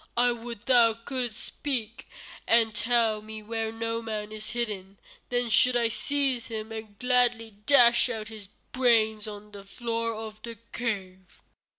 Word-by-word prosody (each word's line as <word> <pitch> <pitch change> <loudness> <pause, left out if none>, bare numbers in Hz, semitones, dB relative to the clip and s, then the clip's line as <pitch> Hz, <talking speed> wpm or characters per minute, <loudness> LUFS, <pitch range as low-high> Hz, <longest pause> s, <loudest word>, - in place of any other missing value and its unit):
I 245 0 +4
would 235 -2 -7
thou 235 -4 +5
couldst 240 -1 -4
speak 240 -6 -3 0.4
and 225 -1 +4
tell 225 -1 +2
me 215 0 -9
where 225 0 -3
Noman 225 -2 -4
is 215 +1 -7
hidden. 205 -5 -3 0.3
Then 245 0 0
should 250 +2 +4
I 235 -1 +2
seize 270 0 0
him 220 0 -6
and 220 -2 -8
gladly 245 -3 +2
dash 245 -3 +6
out 220 -3 -5
his 215 -3 -9 0.2
brains 220 -4 +3
on 210 0 -9
the 200 -1 -10
floor 230 +2 -3
of 215 -1 -8
the 230 -1 -8
cave." 190 -6 -5
225 Hz, 150 wpm, -27 LUFS, 215-240 Hz, 0.4 s, dash